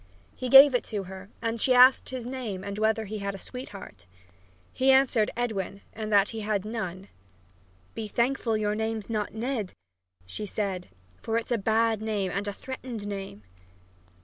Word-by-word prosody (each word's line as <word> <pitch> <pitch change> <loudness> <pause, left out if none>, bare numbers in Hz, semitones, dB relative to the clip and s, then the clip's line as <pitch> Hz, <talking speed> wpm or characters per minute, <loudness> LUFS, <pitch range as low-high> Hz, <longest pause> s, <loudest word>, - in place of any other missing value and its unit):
He 255 - -4
gave 270 +2 +10
it 245 - +1
to 205 -3 -3
her 190 +1 -10
and 230 -1 -1
she 255 - +4
asked 255 +1 +6
him 260 - -3
his 240 - -7
name 240 -7 -5
and 200 +1 -5
whether 220 0 +1
he 215 +1 -5
had 200 0 -3
a - - -6
sweetheart. 195 - -9 0.7
He 260 +1 +2
answered 265 -5 +4
Edwin, 200 -5 -3
and 215 -1 -5
that 200 -1 +4
he 225 - -6
had 210 -2 -1
none. 195 -4 -5 0.9
"Be 225 -1 -5
thankful 235 0 0
your 210 -1 0
name's 220 0 -3
not 210 -1 -2
Ned," 230 -3 -3 0.5
she 205 - -6
said, 190 -3 -3 0.3
"for 225 0 -1
it's 230 - -4
a 240 - +3
bad 220 +1 +2
name 210 -4 -1
and 200 +2 -2
a 205 - -2
threatened 250 -3 -7
name!" 195 - -6
220 Hz, 175 wpm, -27 LUFS, 200-235 Hz, 0.9 s, gave